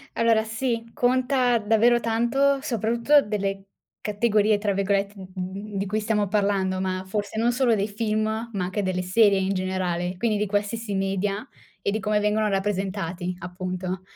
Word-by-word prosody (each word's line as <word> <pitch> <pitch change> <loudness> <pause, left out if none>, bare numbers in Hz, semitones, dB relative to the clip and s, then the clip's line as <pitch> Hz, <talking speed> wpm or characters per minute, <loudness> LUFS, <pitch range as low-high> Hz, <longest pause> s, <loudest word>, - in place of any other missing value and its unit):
Allora 230 -1 +3
sì, 230 +1 -2
conta 250 0 +2
davvero 225 +3 +3
tanto 240 +5 +2
soprattutto 235 +2 +3
delle 195 -3 -3 0.4
"categorie" 210 0 +2
tra 205 -1 0
virgolette 200 +1 0
d 190 +2 -7
di 195 +1 -1
cui 210 +3 -1
stiamo 210 -1 +1
parlando, 195 -2 +1
ma 185 0 -2
forse 205 +2 -3
non 235 +2 +2
solo 245 -2 +3
dei 205 0 0
film, 215 +1 -1
ma 220 -3 -3
anche 185 +3 -2
delle 185 -1 -1
serie 200 +2 +4
in 190 +1 0
generale, 185 -1 -2
quindi 220 +2 0
di 210 - 0
qualsiasi 205 +2 -2
media, 195 +1 -1 0.4
e - - +1
di 215 +2 -2
come 210 +1 +1
vengono 210 +1 +1
rappresentati, 190 -3 -2
appunto. 185 +1 -4
205 Hz, 155 wpm, -25 LUFS, 190-225 Hz, 0.4 s, serie